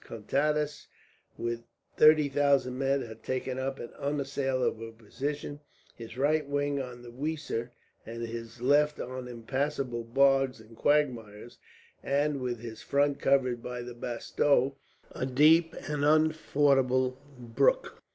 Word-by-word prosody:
Contades, 150 +6 -1 0.5
with 120 0 -3 0.3
thirty 155 -1 +6
thousand 140 -2 +2
men, 135 0 +1
had 110 -1 -10
taken 130 0 -3
up 135 +1 -2
an 120 - -8
unassailable 135 -5 -1
position: 145 +6 -5 0.4
his 115 0 -10
right 150 +2 +1
wing 145 0 0
on 125 -2 -8
the 120 - -10
Weser, 140 -3 -3 0.3
and 115 +1 -7
his 115 0 -7
left 150 +3 +3
on 130 0 -5
impassable 125 +1 -3
bogs 135 +1 +3
and 110 +1 -15
quagmires, 120 -6 0 0.4
and 145 0 0
with 120 -3 -3
his 115 -2 -8
front 140 0 +1
covered 130 -3 +2
by 125 0 -5
the 120 0 -8
Bastau, 125 +3 +1 0.4
a 130 - -3
deep 155 +5 +4
and 150 -2 -2
unfordable 140 -4 +2 0.2
brook. 470 - 0
135 Hz, 125 wpm, -29 LUFS, 120-145 Hz, 0.5 s, thirty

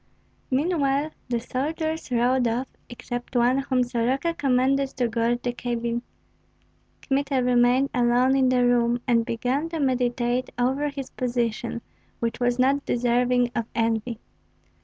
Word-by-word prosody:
Meanwhile 285 0 +1 0.2
the 240 -1 0
soldiers 315 +6 -3
rode 245 +1 +2
off, 240 +3 -1 0.2
except 245 +1 -7
one, 245 +2 +3
whom 260 -2 +1
Soroka 250 +7 0
commanded 270 -1 +1
to 245 -2 +1
guard 235 +1 0
the 245 - -1
cabin. 235 -1 -2 1.0
Kmita 275 -1 0
remained 250 +2 +3
alone 245 +2 +3
in 265 -1 +3
the 250 -1 +3
room, 240 0 +2
and 235 -2 +3
began 255 +7 -1
to 330 -1 -4
meditate 250 -2 0
over 265 +4 +1
his 275 -2 -7
position, 235 -2 -2 0.4
which 235 0 -2
was 245 0 +1
not 270 +2 +2
deserving 245 0 +1
of 230 -1 -2
envy. 225 0 -1
250 Hz, 135 wpm, -25 LUFS, 240-270 Hz, 1.0 s, one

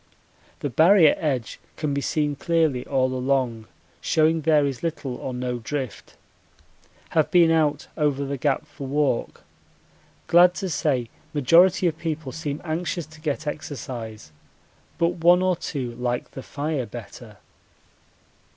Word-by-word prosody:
The 145 - -2
Barrier 165 - +6
edge 135 -7 -2 0.2
can 150 -2 -1
be 140 - -1
seen 150 0 0
clearly 160 -5 +1
all 130 -2 +1
along, 125 -4 -1 0.3
showing 160 +1 +2
there 155 -1 +3
is 135 -3 -3
little 160 -6 -3
or 130 - -5
no 125 -1 -3
drift. 130 0 -5 0.9
Have 155 -2 +2
been 170 -2 +5
out 150 -3 +1
over 145 -3 0
the 140 +1 -3
Gap 140 +2 0
for 145 -2 -9
walk. 140 -3 -1 0.8
Glad 175 +1 +6
to 190 -2 -3
say 130 -7 -1 0.2
majority 170 +7 +5
of 165 -2 0
people 155 -4 -4
seem 150 0 -4
anxious 170 +1 -2
to 155 -1 -16
get 155 0 -2
exercise, 120 - -6 0.7
but 170 0 0
one 175 +2 +6
or 185 -1 +2
two 135 -7 -4
like 120 0 -3
the 135 - -8
fire 145 -2 -3
better. - - -10
145 Hz, 140 wpm, -24 LUFS, 130-160 Hz, 0.9 s, Barrier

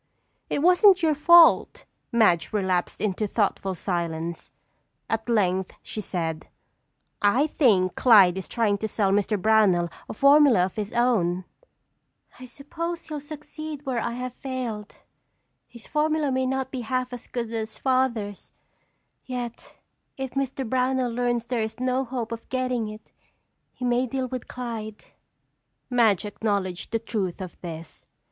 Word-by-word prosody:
"It 285 - -1
wasn't 365 +1 +6
your 315 -1 +4
fault." 335 +3 +5 0.3
Madge 215 -8 +3
relapsed 185 -4 -1
into 210 0 -1
thoughtful 195 -2 -1
silence. 170 -2 -3 0.6
At 225 +1 -2
length 190 -4 +1
she 215 - -5
said: 165 -5 -4 0.7
"I 225 +8 +4
think 210 - +2
Clyde 200 -8 +6
is 190 - -5
trying 210 -4 0
to 220 - -2
sell 200 -2 0
Mr. 205 +1 +1
Brownell 190 -4 +3 0.2
a - - -5
formula 275 -7 +6
of 185 - -7
his 210 -1 -4
own." 185 -7 +1 0.9
"I 255 - -9
suppose 325 +7 -6
he'll 305 -1 -4
succeed 300 0 -8
where 255 -3 -1
I 235 - -2
have 250 0 -5
failed. 245 -6 -5 0.7
His 235 -2 -14
formula 305 -1 0
may 260 0 0
not 265 0 -2
be 260 - -4
half 255 +2 -2
as 245 - -8
good 235 -2 -4
as 220 -1 -4
Father's, 240 -6 -1 0.7
yet 245 -2 -6 0.4
if 265 -1 -4
Mr. 270 -1 -2
Brownell 255 0 0
learns 240 0 -1
there 240 -1 -1
is 220 +1 -4
no 255 +1 0
hope 240 -2 -4
of 230 0 -7
getting 255 -3 -1
it 215 0 -11 0.6
he 250 - -6
may 245 +1 +1
deal 260 +1 -2
with 255 -1 -6
Clyde." 225 -4 -6 0.9
Madge 225 -6 +3
acknowledged 200 -4 -2
the 230 - +1
truth 210 -5 -3
of 185 -2 -8
this. 165 -2 -9
235 Hz, 145 wpm, -25 LUFS, 205-260 Hz, 0.9 s, wasn't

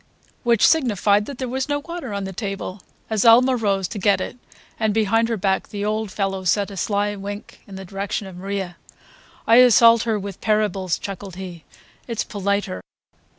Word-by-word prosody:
Which 235 -3 +4
signified 210 - +2
that 280 - -7
there 255 - -3
was 265 +3 -3
no 290 - +1
water 330 -4 -6
on 200 -1 -3
the 190 0 -5
table. 195 -1 -5 0.3
Azalma 235 +4 +5
rose 200 -5 0
to 215 - -5
get 200 +1 +3
it, - - -5 0.4
and 220 -2 +1
behind 225 +1 +2
her 230 - -1
back 190 -1 0
the 205 -1 -4
old 215 0 -1
fellow 195 -1 -2
sent 200 +2 +1
a - - -8
sly 205 +2 0
wink 200 +1 -8
in 195 - -10
the 190 0 -8
direction 195 +2 -4
of 190 -2 -10
Maria. 190 -2 -4 0.7
"I 230 - +6
assault 235 -2 +7
her 225 -2 0
with 200 -2 -7
parables," 205 -4 0
chuckled 195 -1 -7
he. 180 -3 -8 0.4
"It's 230 -3 -2
politer." 200 - -2
205 Hz, 180 wpm, -22 LUFS, 195-230 Hz, 0.7 s, assault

